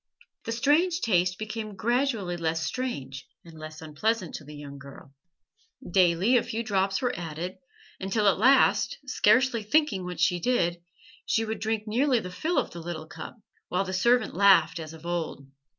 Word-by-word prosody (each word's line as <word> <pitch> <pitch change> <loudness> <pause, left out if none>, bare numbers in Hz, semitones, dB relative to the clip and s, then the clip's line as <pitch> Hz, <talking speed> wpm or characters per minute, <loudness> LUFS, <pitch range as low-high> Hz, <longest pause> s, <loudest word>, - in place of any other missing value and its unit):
The - - -3
strange 310 +9 +2
taste 180 -4 +2
became 215 -1 -5
gradually 230 -4 0
less 165 -1 -1
strange 135 - -4 0.2
and 165 - -13
less 155 0 -9
unpleasant 180 +5 -1
to - - -7
the 150 +1 -11
young 140 -1 -9
girl; 140 0 -13 0.7
daily 185 +6 +3
a - - +3
few 230 0 -4
drops 195 0 0
were 245 - +1
added, 170 +2 -6 0.4
until 200 +2 0
at 190 - +3
last, 265 +5 +4
scarcely 255 -1 +3
thinking 215 -4 +1
what 180 0 -6
she 180 -2 +2
did, 175 -6 0 0.5
she 225 - +1
would 220 0 -4
drink 220 -1 -1
nearly 250 +4 +2
the 180 -4 -7
fill 315 - -2
of - - 0
the 170 - -8
little 165 -2 -6
cup, 160 - -9 0.3
while 180 +2 0
the 185 - -5
servant 235 +4 +2
laughed 180 -3 +5
as 160 -1 -7
of 160 +1 -13
old. 170 -5 -3
190 Hz, 170 wpm, -27 LUFS, 170-230 Hz, 0.7 s, laughed